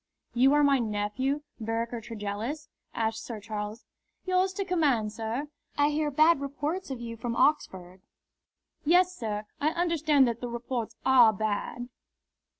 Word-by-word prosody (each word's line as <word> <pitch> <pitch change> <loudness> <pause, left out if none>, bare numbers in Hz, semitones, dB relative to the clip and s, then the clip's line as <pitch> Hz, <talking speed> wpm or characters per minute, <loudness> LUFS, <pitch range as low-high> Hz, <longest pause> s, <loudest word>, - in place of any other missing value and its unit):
"You 260 +3 +5
are 295 - +4
my 280 -2 +4
nephew, 230 +6 -1 0.2
Vereker 230 +1 -2
Tregellis?" 225 +6 -5 0.2
asked 225 -1 -2
Sir 230 -3 -6
Charles. 210 +1 -6 0.4
"Yours 370 0 +2
to 395 +1 -3
command, 280 - +1
sir." 230 +6 -3 0.3
"I 290 0 +4
hear 300 0 0
bad 310 +2 +4
reports 290 +6 -3
of 265 -3 -4
you 230 -1 -6
from 230 +1 -4
Oxford." 190 -11 0 0.8
"Yes, 360 +3 +4
sir, 215 -6 -4
I 295 - +2
understand 315 -5 +3
that 235 0 -3
the 245 - -3
reports 235 -1 -4
are 250 -4 +7
bad." 215 +3 -3
245 Hz, 145 wpm, -28 LUFS, 220-295 Hz, 0.8 s, are